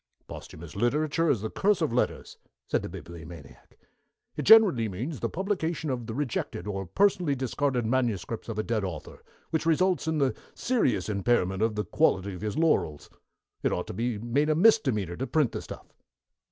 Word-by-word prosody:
"Posthumous 80 +1 -10
literature 150 - +1
is 120 -9 +2
the 110 - -4
curse 205 0 +2
of 155 -7 0
letters," 125 - -2 0.3
said - - 0
the - - -6
Bibliomaniac. 80 -3 -11 0.6
"It - - -3
generally 190 - +6
means 125 - -5
the - - -2
publication 170 -5 -2
of 120 -3 -4
the 110 - -5
rejected, 125 -9 -3
or 95 -2 -4
personally 180 - +2
discarded, 130 -1 -1
manuscripts 115 -3 -1
of 110 - -4
a 110 - 0
dead 110 -2 -1
author, 85 -5 -6 0.3
which 160 0 -1
results 180 +1 +2
in 160 -1 0
the 135 -3 +2 0.2
serious 130 - +1
impairment 100 -2 +1
of 110 -1 +1
the 105 -1 -2
quality 95 +3 +1
of 90 - -8
his 105 -1 -3
laurels. 150 - +1 0.5
It - - +1
ought - - -2
to - - -7
be 115 +3 -2
made 120 +8 0
a 155 - +3
misdemeanor 130 - +3
to 130 - -3
print 150 -7 +2
the - - -4
stuff." - - -11
120 Hz, 180 wpm, -27 LUFS, 100-155 Hz, 0.6 s, generally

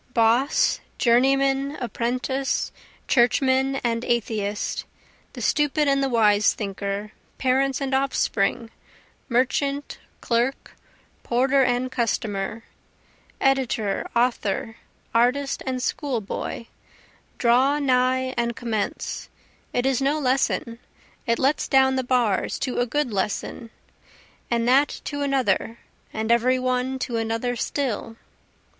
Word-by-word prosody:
Boss, 235 +4 +3 0.2
journeyman, 270 +3 +2
apprentice, 255 +2 -2 0.4
churchman 265 +2 +3
and 230 -1 0
atheist, 215 -4 -1 0.5
The - - -6
stupid 295 0 +2
and 275 0 +3
the 270 - +1
wise 215 -4 +3
thinker, 200 0 -4 0.3
parents 265 +1 +1
and 275 -1 -2
offspring, 235 -4 0 0.6
merchant, 275 +3 0 0.2
clerk, 240 +3 -1 0.5
porter 265 +3 +2
and 250 +1 0
customer, 225 -3 -2 0.8
Editor, 255 -7 0
author, 225 -3 0 0.4
artist, 255 +4 +1
and 255 -1 -2
schoolboy 235 -5 -3 0.7
draw 255 +4 +3
nigh 260 -2 +1
and 235 -1 -1
commence; 220 -4 -3 0.4
It 245 - 0
is 270 -1 +1
no 280 +3 +2
lesson 255 -3 0 0.5
it 230 0 +2
lets 275 +3 +1
down 265 0 +4
the 260 - 0
bars 245 -6 +1
to 255 - -1
a 245 - +1
good 285 -2 -1
lesson, 205 +4 -3 0.8
And 235 0 0
that 275 +4 +3
to 285 0 -4
another, 255 -5 0 0.3
and 220 +1 -2
every 245 +2 +3
one 255 +1 -1
to 245 -2 -3
another 225 +2 -1
still. 235 -4 -3
250 Hz, 110 wpm, -24 LUFS, 230-270 Hz, 0.8 s, down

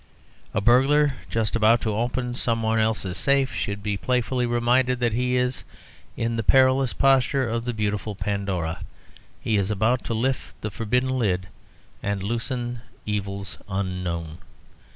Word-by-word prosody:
A 105 - +2
burglar 135 +6 +4 0.2
just 110 -1 0
about 115 +1 +5
to 110 - -1
open 120 +3 -1
some 115 -2 -1
one 110 0 +2
else's 110 -4 0
safe 140 -2 +2
should 100 0 -3
be 105 -1 -1
playfully 125 +2 0
reminded 120 +1 +2
that 120 -2 +1
he 125 +2 +1
is 125 0 -1 0.5
in 115 0 -1
the 115 - -1
perilous 130 +2 +4
posture 135 -1 +3
of 115 +1 -2
the 125 - -1
beautiful 105 -1 -2
Pandora: 95 -4 -2 0.6
he 110 - 0
is 100 0 0
about 110 +4 +1
to 115 - -2
lift 130 +4 -2
the 105 - -3
forbidden 125 +6 0
lid 95 -5 0 0.5
and 100 -1 -2
loosen 120 +2 -2 0.2
evils 100 -2 -4
unknown. 90 -4 -3
115 Hz, 150 wpm, -24 LUFS, 100-125 Hz, 0.6 s, about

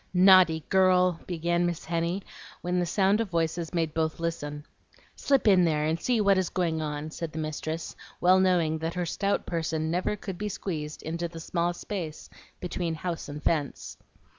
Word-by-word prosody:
"Naughty 180 -4 +6
girl!" 185 -2 +4
began 175 0 0
Miss 175 -2 -2
Henny, 170 +3 -1 0.4
when 180 +1 0
the 175 - 0
sound 200 +4 +2
of 225 - -3
voices 165 -1 -1
made 165 -3 -1
both 160 0 -1
listen. 150 -3 -4 0.5
"Slip 275 -4 +1
in 190 -3 +6
there, 155 -3 +1
and 160 +2 -1
see 245 -3 +1
what 200 -2 +4
is 185 - -1
going 165 -3 -1
on," 150 0 -4
said 165 0 -5
the - - -7
mistress, 155 +1 -4 0.2
well 185 +1 +5
knowing 170 -4 +2
that 165 +2 -3
her 180 -1 -1
stout 200 +4 -1
person 160 -2 -2
never 180 +4 0
could 195 -3 -7
be 210 0 -2
squeezed 155 -6 -5
into 170 +2 -3
the 165 0 -9
small 170 +1 -1
space 175 -3 -6 0.3
between 175 -2 -3
house 165 -1 -4
and 150 +1 -7
fence. 150 -4 -1
170 Hz, 180 wpm, -27 LUFS, 160-185 Hz, 0.5 s, Naughty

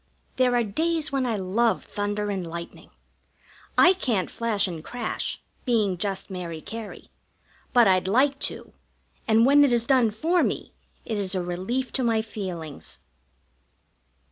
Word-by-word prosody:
There 250 -1 +3
are 240 - +3
days 315 +8 0
when 270 -2 0
I 230 - 0
love 210 +5 +1
thunder 205 0 -2
and 185 -3 -3
lightning. 170 +1 -8 0.9
I 360 - +7
can't 235 - -1
flash 215 -4 0
and 165 -4 -6
crash, 240 +2 -4 0.2
being 215 -7 +2
just 195 +2 -3
Mary 175 -4 -5
Cary; 220 +4 -8 0.6
but 240 -4 +6
I'd 185 -1 +3
like 270 +7 +3
to, - - -11 0.5
and 225 +1 +5
when 285 +2 +6
it 280 - +4
is 235 -1 +2
done 250 -3 +4
for 325 +12 +1
me - - -2 0.3
it 220 -3 -2
is 195 -1 -2
a 185 - 0
relief 190 +9 -3
to 260 - 0
my 225 -2 +2
feelings. 180 -9 -6
220 Hz, 150 wpm, -25 LUFS, 190-250 Hz, 0.9 s, I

